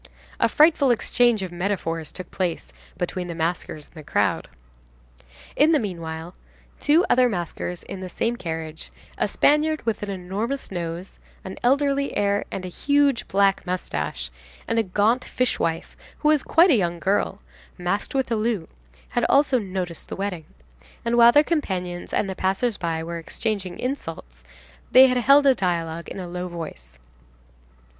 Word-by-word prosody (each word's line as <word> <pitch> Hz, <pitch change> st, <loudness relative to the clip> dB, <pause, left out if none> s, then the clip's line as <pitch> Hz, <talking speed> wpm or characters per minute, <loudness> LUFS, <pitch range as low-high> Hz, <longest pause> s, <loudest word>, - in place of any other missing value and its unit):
A -, -, +3 dB
frightful 300 Hz, 0 st, +4 dB
exchange 240 Hz, -2 st, +2 dB
of 185 Hz, -, -5 dB
metaphors 175 Hz, -3 st, -2 dB
took 185 Hz, -, -8 dB
place 180 Hz, -3 st, -3 dB, 0.2 s
between 180 Hz, 0 st, -3 dB
the 170 Hz, -, -5 dB
maskers 165 Hz, -2 st, -3 dB
and -, -, -25 dB
the 155 Hz, -2 st, -10 dB
crowd. -, -, 0 dB, 1.1 s
In 310 Hz, +3 st, +5 dB
the 305 Hz, -, +4 dB
meanwhile, 165 Hz, -4 st, -5 dB, 0.5 s
two 320 Hz, +4 st, +4 dB
other 250 Hz, 0 st, +4 dB
maskers 175 Hz, -2 st, -4 dB
in 195 Hz, -, -7 dB
the 185 Hz, -1 st, -6 dB
same 230 Hz, +6 st, -1 dB
carriage, 160 Hz, -5 st, -6 dB, 0.3 s
a -, -, +2 dB
Spaniard 305 Hz, +1 st, +2 dB
with 225 Hz, -2 st, -1 dB
an 205 Hz, -, -4 dB
enormous 200 Hz, +9 st, -4 dB
nose, 175 Hz, 0 st, -5 dB, 0.2 s
an 190 Hz, -, -7 dB
elderly 280 Hz, +2 st, +1 dB
air, 200 Hz, 0 st, +1 dB
and 185 Hz, -, -5 dB
huge 285 Hz, +7 st, +1 dB
black 195 Hz, 0 st, +2 dB
moustache, 75 Hz, -, -3 dB, 0.4 s
and 230 Hz, -, +1 dB
a -, -, +3 dB
gaunt 210 Hz, +6 st, +1 dB
fishwife, 165 Hz, -10 st, -1 dB, 0.2 s
who 300 Hz, -, +2 dB
was 305 Hz, -2 st, +4 dB
quite 340 Hz, +3 st, +5 dB
a -, -, +6 dB
young 175 Hz, -5 st, 0 dB
girl, 195 Hz, +2 st, 0 dB, 0.4 s
masked 185 Hz, +8 st, -2 dB
with 265 Hz, -3 st, 0 dB
a -, -, +3 dB
loup,67 165 Hz, -, -4 dB
had 240 Hz, -, 0 dB
also 275 Hz, -2 st, +4 dB
noticed 185 Hz, -5 st, -5 dB
the -, -, -4 dB
wedding, 190 Hz, -5 st, -4 dB, 0.6 s
and 235 Hz, 0 st, +1 dB
while 235 Hz, 0 st, +8 dB
their 295 Hz, +4 st, +6 dB
companions 185 Hz, -, -2 dB
and -, -, 0 dB
the 190 Hz, -, -3 dB
passers 195 Hz, +5 st, 0 dB
by 165 Hz, -3 st, -2 dB
were 170 Hz, +1 st, -5 dB
exchanging 190 Hz, +1 st, -3 dB
insults, 165 Hz, -, -5 dB, 0.5 s
they 260 Hz, +1 st, +9 dB
had 250 Hz, -1 st, +2 dB
held 275 Hz, +4 st, +5 dB
a 270 Hz, -, +7 dB
dialogue 170 Hz, -5 st, -2 dB
in -, -, -7 dB
a 180 Hz, -, -5 dB
low 180 Hz, +1 st, -4 dB
voice. 155 Hz, -, -8 dB
195 Hz, 160 wpm, -24 LUFS, 170-245 Hz, 1.1 s, they